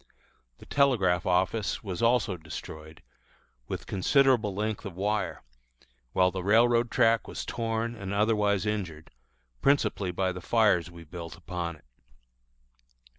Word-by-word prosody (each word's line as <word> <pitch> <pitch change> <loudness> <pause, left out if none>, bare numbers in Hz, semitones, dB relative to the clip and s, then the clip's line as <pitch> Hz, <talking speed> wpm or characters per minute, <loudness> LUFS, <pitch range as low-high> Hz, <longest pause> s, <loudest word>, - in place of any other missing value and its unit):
The - - -15
telegraph 100 - +2
office 95 +4 0
was 95 -4 -4
also 115 -4 +2
destroyed, 80 -1 -9 0.6
with - - -5
considerable 115 +1 +2
length 105 +1 -2
of 95 -4 -7
wire, 100 -1 -2 0.7
while 90 +6 +3
the 95 - -4
railroad 115 +4 +4
track 115 -3 +3
was - - -6
torn 115 0 -2
and 100 -4 -6
otherwise 105 -1 +2
injured, 90 -8 -4 0.5
principally 135 -8 +2
by 95 +1 0
the 90 0 -7
fires 105 -6 +2
we 85 -1 -12
built 85 +1 -8
upon 85 -2 -5
it. 75 - -22
100 Hz, 125 wpm, -28 LUFS, 90-115 Hz, 0.7 s, railroad